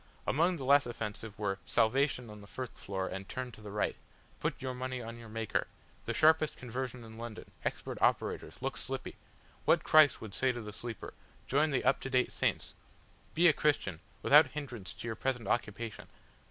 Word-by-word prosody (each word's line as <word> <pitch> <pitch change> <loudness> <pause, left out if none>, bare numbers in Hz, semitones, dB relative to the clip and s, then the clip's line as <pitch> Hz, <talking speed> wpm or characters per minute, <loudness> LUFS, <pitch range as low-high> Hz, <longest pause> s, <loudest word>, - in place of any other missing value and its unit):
Among 170 +5 +2
the 140 - -6
less 140 0 +6
offensive 110 -2 -5
were 100 -2 -1
"Salvation 125 0 +2
on 105 0 -10
the 100 - -13
First 130 +2 -6
Floor 95 -1 -3
and 95 +1 -6
turn 130 -1 -4
to 110 - -14
the 105 - -8
Right." 105 +1 0 0.4
"Put - - -1
your 130 -1 -3
Money 130 0 -3
on 115 0 -7
your 115 -1 -10
Maker." 110 0 -1 0.4
"The - - -1
Sharpest 155 0 +4
Conversion 125 0 -4
in 110 0 -11
London, 115 -2 -7
Expert - - -3
Operators! - - +1
Look - - -2
Slippy!" - - -5 0.5
"What - - +4
Christ 155 -4 +6
would 110 -3 -8
say 130 +4 +2
to 120 - -5
the 105 -1 -7
Sleeper; 115 -1 -6 0.3
Join 150 +4 +3
the 135 -3 +1
Up - - +4
to 135 - -5
date 130 -1 +2
Saints!" - - -1 0.6
"Be 175 +2 +6
a 160 - +7
Christian 135 - +1 0.2
without 150 +1 +8
hindrance 125 -8 -6
to - - -7
your 115 - -2
present 125 -5 -1
Occupation." 110 -1 -2
120 Hz, 190 wpm, -33 LUFS, 110-135 Hz, 0.6 s, without